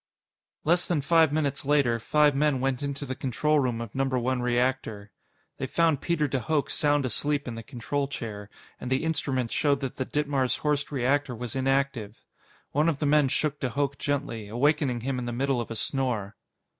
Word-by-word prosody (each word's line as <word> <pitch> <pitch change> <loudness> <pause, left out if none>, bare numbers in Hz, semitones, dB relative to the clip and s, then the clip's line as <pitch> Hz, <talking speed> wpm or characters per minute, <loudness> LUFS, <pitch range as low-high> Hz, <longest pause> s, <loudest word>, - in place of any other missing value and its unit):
Less 175 +3 +2
than 170 -4 +1
five 160 +1 +4
minutes 145 -2 -1
later, 140 -5 +2
five 145 +5 +3
men 145 -1 +2
went 130 0 0
into 140 0 -3
the 130 - -3
control 145 +4 +1
room 125 -4 0
of 115 -3 -6
Number 135 -1 0
One 125 +1 0
Reactor. 120 -4 -1 0.5
They 130 - -2
found 160 0 +2
Peter 170 -4 +1
de 135 -1 -1
Hooch 140 +3 0
sound 145 -2 +2
asleep 145 +4 0
in 120 - -3
the 115 - -6
control 135 +3 -3
chair, 105 -6 -6 0.3
and 125 - -6
the 130 +2 +1
instruments 135 -7 -1
showed 145 -2 +2
that 135 -2 -4
the 130 - -1
Ditmars 140 -4 0
Horst 150 -1 -1
reactor 135 0 +1
was 120 0 -5
inactive. 135 -5 0 0.5
One 150 +4 +3
of 155 - -1
the 150 - -1
men 145 -1 +4
shook 145 +2 -1
de 130 - -1
Hooch 140 +1 -1
gently, 135 -7 -2
awakening 130 +2 +1
him 130 +1 -2
in 125 - -4
the - - -2
middle 130 +1 0
of 115 - -6
a 115 - -5
snore. 115 -5 -2
135 Hz, 195 wpm, -27 LUFS, 125-145 Hz, 0.5 s, five